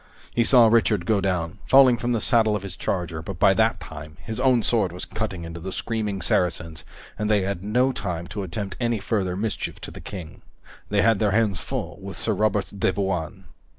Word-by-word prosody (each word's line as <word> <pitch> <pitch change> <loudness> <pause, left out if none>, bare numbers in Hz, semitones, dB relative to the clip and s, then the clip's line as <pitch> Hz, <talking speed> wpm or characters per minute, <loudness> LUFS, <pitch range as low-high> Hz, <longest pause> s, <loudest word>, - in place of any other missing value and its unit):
He 120 - +3
saw 120 0 +6
Richard 110 -5 +3
go 105 -1 +2
down, 90 -3 -2
falling 135 -2 +7
from 120 +2 -2
the 115 - +1
saddle 110 -4 +3
of 100 - -4
his 95 -3 -6
charger, 85 -4 -3
but 85 +2 -7
by 95 - +5
that 110 +2 +2
time 75 0 -10
his 110 +6 -5
own 130 -3 +3
sword 105 -7 +2
was 90 +1 -6
cutting 100 -6 -4
into 85 0 -7
the 95 +3 -6
screaming 105 -5 -2
Saracens 85 -2 0 0.4
and 105 0 -1
they 105 -3 +3
had 95 -1 -3
no 125 +6 +2
time 90 -9 -4
to 105 - -4
attempt 95 +2 -5
any 120 -2 +1
further 95 -3 -1
mischief 105 +3 -3
to - - -7
the - - -10
King. 90 -6 -8 0.5
They 100 -1 +2
had 115 -2 +4
their 105 - +2
hands 105 -3 +2
full - - -5
with - - -7
Sir - - 0
Robert 105 -2 +1
de 95 - +1
Bouain. 95 -1 -3
100 Hz, 210 wpm, -24 LUFS, 90-110 Hz, 0.5 s, falling